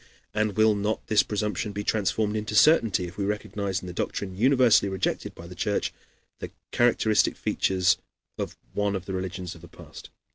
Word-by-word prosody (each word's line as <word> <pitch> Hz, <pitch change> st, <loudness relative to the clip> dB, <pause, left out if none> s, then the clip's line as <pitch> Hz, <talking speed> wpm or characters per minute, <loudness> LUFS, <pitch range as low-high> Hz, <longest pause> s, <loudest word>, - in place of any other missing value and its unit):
And 110 Hz, -2 st, 0 dB
will 110 Hz, 0 st, +5 dB
not 105 Hz, +1 st, -2 dB
this 110 Hz, -2 st, +4 dB
presumption 105 Hz, 0 st, -2 dB
be 105 Hz, +1 st, -4 dB
transformed 105 Hz, +1 st, 0 dB
into 105 Hz, 0 st, -3 dB
certainty 115 Hz, -, +4 dB
if 90 Hz, +2 st, -10 dB
we -, -, 0 dB
recognize 100 Hz, -1 st, -2 dB
in -, -, -9 dB
the 90 Hz, -, -6 dB
doctrine 95 Hz, +2 st, -3 dB
universally 125 Hz, -2 st, +4 dB
rejected 95 Hz, -1 st, -2 dB
by 85 Hz, -, -10 dB
the 90 Hz, -, -9 dB
Church 100 Hz, +3 st, -1 dB, 0.5 s
the -, -, -6 dB, 0.2 s
characteristic 115 Hz, -3 st, +3 dB
features 95 Hz, -1 st, +1 dB, 0.4 s
of -, -, -5 dB, 0.2 s
one 105 Hz, -1 st, 0 dB
of 95 Hz, -1 st, -4 dB
the 95 Hz, -, -5 dB
religions 95 Hz, -1 st, -4 dB
of 85 Hz, -, -14 dB
the 85 Hz, -, -12 dB
past? -, -, -13 dB
100 Hz, 180 wpm, -26 LUFS, 95-110 Hz, 0.5 s, will